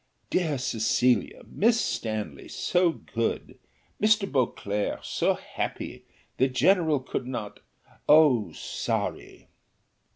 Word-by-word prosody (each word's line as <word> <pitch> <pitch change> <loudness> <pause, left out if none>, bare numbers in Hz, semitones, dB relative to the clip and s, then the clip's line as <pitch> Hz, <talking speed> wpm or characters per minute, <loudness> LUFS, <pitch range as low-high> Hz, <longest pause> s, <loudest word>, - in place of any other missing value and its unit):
"Dear 160 -6 +1
Cecilia! 120 0 +1
Miss 230 +2 +2
Stanley, 110 - -3
so 180 0 +1
good! 115 -7 -4 0.4
Mr. 215 +1 +4
Beauclerc, 105 - -1
so - - +1
happy! - - -5 0.3
the 130 - +4
general 160 +2 +3
could 130 -1 -4
not? 110 -5 -5 0.5
so 145 -8 +5
sorry!" - - -4
130 Hz, 95 wpm, -27 LUFS, 115-170 Hz, 0.5 s, so